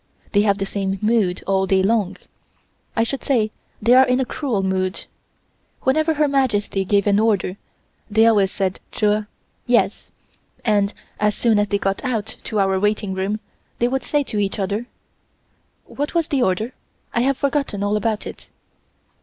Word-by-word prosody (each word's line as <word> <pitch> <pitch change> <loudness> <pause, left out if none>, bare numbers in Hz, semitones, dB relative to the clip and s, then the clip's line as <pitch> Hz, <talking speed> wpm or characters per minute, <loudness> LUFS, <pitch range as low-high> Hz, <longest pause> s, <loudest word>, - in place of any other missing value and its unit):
They 205 - +4
have 200 -1 +2
the 195 - -2
same 195 -1 -2
mood 210 -4 +1
all 190 0 +1
day 190 0 +3
long 205 -2 +1 0.8
I 225 - +3
should 270 +4 -3
say 225 -6 +1 0.3
they 230 +3 +4
are 260 +1 +7
in 250 +1 +2
a 265 - +1
cruel 240 -8 -2
mood. 190 0 -1 0.8
Whenever 310 +4 +2
Her 300 0 +3
Majesty 230 -8 +1
gave 200 +1 +2
an 205 0 +3
order 205 -4 +1 0.5
they 220 +1 +4
always 205 -4 +4
said 190 -1 -2
"Jer" 210 0 +1 0.4
(Yes) - - +1 0.6
and 205 -3 +2 0.3
as 210 -1 +2
soon 225 -3 +3
as 205 - +2
they 200 - +1
got 195 0 -1
to 220 -3 -3
our 195 -1 +2
waiting 210 -1 0
room 195 +3 -2 0.4
they 240 - +2
would 265 +2 -1
say 295 -1 +1
to 215 -6 -3
each 200 -1 -1
other: 205 +4 -2 1.0
"What 290 +4 -4
was 335 -2 +1
the 275 -3 +1
order? 215 +4 0 0.4
I 235 - +2
have 270 +1 +2
forgotten 275 -8 -1
all 205 +1 +1
about 215 0 -1
it." - - -9
210 Hz, 170 wpm, -21 LUFS, 195-245 Hz, 1.0 s, are